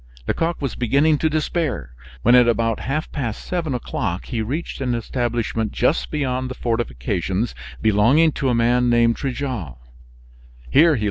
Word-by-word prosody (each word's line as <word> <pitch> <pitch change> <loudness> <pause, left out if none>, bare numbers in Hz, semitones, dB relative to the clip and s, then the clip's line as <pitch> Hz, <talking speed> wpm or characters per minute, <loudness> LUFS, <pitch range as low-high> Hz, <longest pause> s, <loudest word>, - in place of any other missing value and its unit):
Lecoq 165 +1 -1
was 135 -5 -2
beginning 140 +5 +2
to 160 - +2
despair, 155 - -2 0.3
when 120 - +5
at 125 -1 +7
about 115 -1 +1
half 150 +4 -3
past 120 -7 -4
seven 165 -7 -2
o'clock 110 - -3
he 115 -3 -3
reached 140 +8 -4
an 125 -2 0
establishment 115 -2 -2
just 135 +6 +1
beyond 130 -4 -2
the 130 - -6
fortifications 100 - -2 0.3
belonging 115 +10 +4
to 135 -2 -1
a 120 - +2
man 120 +1 +3
named 115 -1 +4
Trigault. 125 - -4
125 Hz, 140 wpm, -21 LUFS, 115-140 Hz, 0.3 s, at